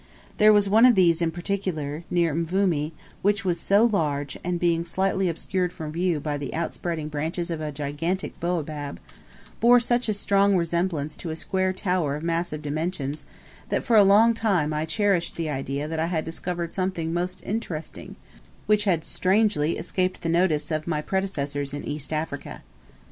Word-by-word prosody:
There 215 0 +7
was 205 -1 +4
one 220 +5 +6
of 245 - +5
these 175 -3 +4
in 170 - +2
particular, 170 -4 -3
near 170 -3 +2
Mvumi, 165 -2 0 0.3
which 200 0 +1
was 175 -2 +1
so 200 +3 +3
large, 145 - 0
and 175 0 -1
being 170 -1 +2
slightly 190 +2 0
obscured 180 +2 -2
from 155 -3 -6
view 170 -1 0
by 145 0 -3
the 140 - -5
outspreading 165 -1 -3
branches 160 +4 -3
of 160 -2 -3
a 155 -1 -3
gigantic 150 +6 -3
baobab, 155 -4 -3 0.6
bore 245 +1 +6
such 240 0 +1
a 215 - +1
strong 200 -1 +3
resemblance 170 -3 -1
to 170 - -6
a 160 - -3
square 185 +3 0
tower 180 -6 -1
of 150 - -6
massive 165 -2 -2
dimensions, 150 -1 -3 0.4
that - - 0
for 235 - +2
a 210 - +8
long 210 +4 +6
time 195 -9 +1
I 155 +1 -1
cherished 180 +1 +1
the 160 -2 -2
idea 140 +1 -3
that 160 0 -3
I 165 - +1
had 165 -3 -1
discovered 170 +1 -4
something 185 -4 -2
most 180 +1 -3
interesting 185 -7 -5 0.5
which 210 0 +2
had 170 -5 +1
strangely 185 -5 +2
escaped 185 +1 -2
the 165 - -1
notice 165 -3 +1
of 155 0 -2
my 155 -3 -1
predecessors 145 -8 -2
in 145 - -6
East 150 0 -5
Africa. 155 -2 -4
170 Hz, 175 wpm, -25 LUFS, 155-190 Hz, 0.6 s, a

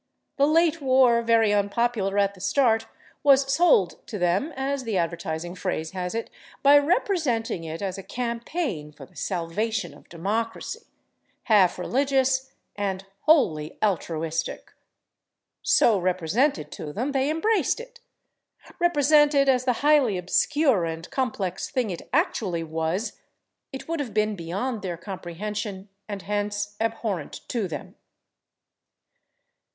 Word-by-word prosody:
The 280 0 +4
late 330 0 +3
war, 255 -3 +4
very 230 -2 +3
unpopular 205 0 0
at 200 0 +2
the 185 - -15
start, 225 +2 +2 0.3
was 275 -1 +4
"sold" 275 - +4
to 215 - -5
them, 185 - +1
as 270 0 -2
the 225 -5 -1
advertising 170 0 -3
phrase 180 -4 -3
has 180 +1 -4
it, 230 - -4 0.3
by 285 +1 +8
representing 285 - 0
it 160 +4 -5
as 195 0 -3
a 195 - -12
campaign 235 - -3
for 145 -2 -12
the - - -26
salvation 185 0 -2
of 145 - -18
democracy, 215 +7 -3 0.6
half 205 -6 +4
religious 265 +4 +1 0.2
and 195 -2 -3 0.2
wholly 160 - +3
altruistic. 165 -5 -2 0.9
So 240 - +4
represented 185 - 0
to 150 - -6
them, 250 - -2
they 270 0 +1
embraced 415 +11 +1
it; 485 0 -11 0.8
represented 295 -4 +4
as 255 -1 +3
the 250 - +3
highly 280 -10 +4
obscure 220 - +2
and 165 +1 -4
complex 200 -8 -2
thing 255 -8 -1
it 175 - -8
actually 225 - 0
was, 160 +6 -3 0.5
it 265 - -8
would 330 -1 -2
have 240 -8 -4
been 215 0 +1
beyond 200 +7 -3
their 180 -3 -4
comprehension, 195 +2 -6 0.2
and 200 -2 -5
hence 205 0 -2
abhorrent 225 -4 -3
to 225 -6 -1
them. 155 -4 -7
215 Hz, 130 wpm, -25 LUFS, 180-270 Hz, 0.9 s, by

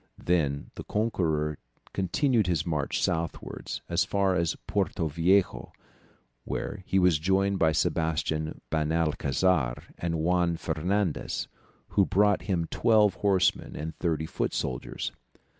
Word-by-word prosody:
Then 75 -5 0
the - - -7
conqueror 80 -9 0 0.3
continued 110 - +1
his 80 -3 0
march 75 -4 -1
southwards 80 0 -3
as - - +2
far 100 -1 +1
as 85 -3 +1
Porto 80 - 0
Viejo, 85 +6 +1 0.7
where 105 - -4
he 95 - +1
was 90 -5 +4
joined 95 +3 +1
by 80 -1 +4
Sebastian 80 +1 -1
Benalcazar 80 -2 +1 0.2
and 85 -1 -1
Juan 85 +1 +1
Fernandez, 90 +3 -1 0.4
who 100 - +3
brought 105 0 +3
him 85 -3 +1
twelve 105 -3 +4
horsemen 95 -4 +1
and 80 0 -5
thirty 80 -2 0
foot - - -2
soldiers. - - -3
85 Hz, 120 wpm, -28 LUFS, 80-95 Hz, 0.7 s, was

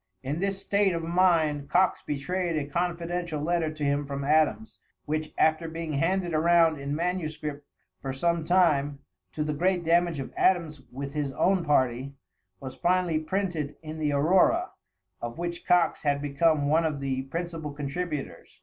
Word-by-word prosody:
In 145 +5 -3
this 195 +1 -1
state 200 -2 +1
of 165 -1 -3
mind 165 -5 +2
Coxe 180 +4 +2
betrayed 170 +4 -2
a 145 - -1
confidential 170 +1 -2
letter 165 +1 0
to 155 -1 -6
him 145 0 0
from 140 0 -4
Adams; 155 +9 +1 0.3
which, 155 +1 -2
after 160 +1 +2
being 165 -1 -5
handed 175 +4 0
around 165 -1 +4
in 140 +1 -3
manuscript 155 -4 -3 0.3
for 135 - -3
some 170 +5 0
time, 155 -5 +2 0.4
to 150 - -1
the 150 0 -2
great 180 +3 +1
damage 170 -1 +2
of 135 - -6
Adams 165 -6 +1
with 140 +2 -6
his 145 -3 -2
own 190 +3 +2
party, 135 -2 +1 0.4
was 130 -1 -7
finally 175 -1 +1
printed 165 -3 -2
in 155 0 -7
the 150 -1 0
Aurora, 185 - +3 0.5
of 120 +3 -5
which 170 0 -5
Coxe 180 -1 +3
had 145 -1 +1
become 145 +1 +1
one 160 +3 +3
of 155 -3 -1
the 135 -1 -2
principal 165 0 -4
contributors. 145 +1 -5
155 Hz, 160 wpm, -27 LUFS, 145-175 Hz, 0.5 s, around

